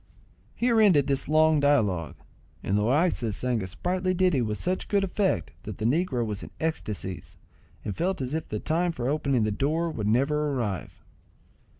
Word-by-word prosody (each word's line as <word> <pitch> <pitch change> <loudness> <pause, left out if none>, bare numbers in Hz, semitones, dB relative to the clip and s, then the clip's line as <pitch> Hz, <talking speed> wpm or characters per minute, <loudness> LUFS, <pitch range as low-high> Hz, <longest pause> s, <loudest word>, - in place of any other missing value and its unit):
Here 235 -2 +3
ended 175 -10 +5
this 140 -1 -1
long 155 0 +4
dialogue, 105 - +1 0.5
and 95 - 0
Loaysa 120 - +1
sang 125 -2 -1
a 95 - -4
sprightly 185 - -1
ditty 180 -7 +2
with 105 -2 -2
such 185 +1 -2
good 200 -1 +2
effect, 190 - 0
that - - -7
the 110 - -3
negro 130 -2 +1
was 105 -2 -4
in - - -8
ecstacies, 105 - -4 0.5
and 100 - -3
felt 185 +2 -1
as 130 +1 -3
if 160 - -3
the 105 - -2
time 170 +8 0
for 125 -6 -3
opening 140 -4 +1
the 105 - 0
door 155 +9 0
would 105 -8 -3
never 145 +6 +1
arrive. 105 -8 -4
145 Hz, 175 wpm, -27 LUFS, 110-170 Hz, 0.5 s, ended